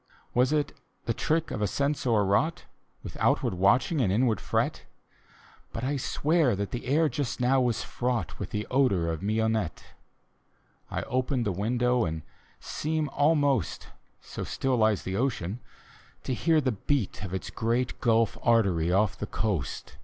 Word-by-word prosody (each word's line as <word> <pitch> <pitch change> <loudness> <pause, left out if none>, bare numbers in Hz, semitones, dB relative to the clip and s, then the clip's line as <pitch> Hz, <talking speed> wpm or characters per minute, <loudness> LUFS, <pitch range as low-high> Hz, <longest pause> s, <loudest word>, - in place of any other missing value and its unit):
Was 125 +3 +3
it 150 -2 0 0.3
the 115 - 0
trick 160 +6 0
of 105 - -3
a 105 - +2
sense 140 +5 -1
o'erwroi^ht 110 - +2 0.4
With - - -8
outward - - +2
watching 120 - +3
and 100 -6 +2
inward 110 0 +2
fret? - - -1 0.9
But 115 - -4
I 140 +3 0
swear 150 -1 +1
that 100 0 -3
the 120 0 -5
air 155 +4 +3
just 135 -2 -3
now 130 +2 +3
was 120 -2 0
fraught 120 -6 -2
With - - -4
the 105 0 -3
odor 100 -11 +2
of 80 - -4
mignonette 110 -3 0 1.1
I - - -2
I - - -6
open 130 0 -1
the 105 - 0
window 120 +5 +1
and 80 -1 -3 0.4
seem 155 -1 -2
almost 145 - +1 0.2
— - - -41
So - - -3
still 135 -1 -1
lies 110 -3 +2
the 95 +1 -3
ocean 115 -5 -1 0.3
— - - -27
to 130 - -2
hear 160 +5 +3
the 130 -3 +1
beat 115 +1 -1
Of 95 - -5
its 95 - -4
great 120 +2 -1
Gulf 115 -2 +2
Artery 95 -8 +3
off 100 +2 +2
the - - -3
coast. 95 - -3
120 Hz, 170 wpm, -28 LUFS, 100-135 Hz, 1.1 s, Was